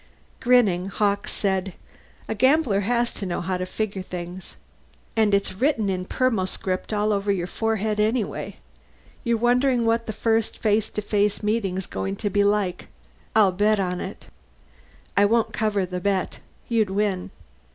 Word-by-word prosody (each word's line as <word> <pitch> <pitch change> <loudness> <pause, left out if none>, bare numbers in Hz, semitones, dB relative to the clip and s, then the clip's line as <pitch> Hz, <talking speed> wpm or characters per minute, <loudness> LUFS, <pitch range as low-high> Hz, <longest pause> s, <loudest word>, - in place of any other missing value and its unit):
Grinning, 215 -8 +3
Hawkes 200 0 0
said, 190 -2 -1 0.5
"A - - -1
gambler 260 -2 +3
has 240 +4 0
to - - -7
know 175 - -2
how 185 +1 -2
to 185 0 -3
figure 200 0 -3
things. 180 0 -7 0.6
And 220 -2 +3
it's 200 -1 +1
written 225 -1 +1
in 185 -1 -2
permoscript 190 -6 -1
all 210 0 +1
over 200 0 0
your 180 -3 -1
forehead 215 +2 -1
anyway. 220 +1 -1 0.7
You're 235 -2 +1
wondering 245 +1 +2
what 230 0 +1
the - - -1
first 225 0 0
face 215 -1 +1
to 210 - -4
face 205 0 +1
meeting's 200 -4 0
going 95 0 -3
to 205 - -3
be 205 -1 +3
like. 200 -3 0 0.5
I'll 210 -4 +6
bet 205 +3 +2
on 180 -2 -1
it." 190 - -7 0.9
"I 200 - +5
won't 230 +2 +2
cover 210 -3 0
the 180 0 -4
bet. 190 0 -1 0.3
You'd 225 -4 +2
win." 195 -1 -1
205 Hz, 155 wpm, -24 LUFS, 190-225 Hz, 0.9 s, I'll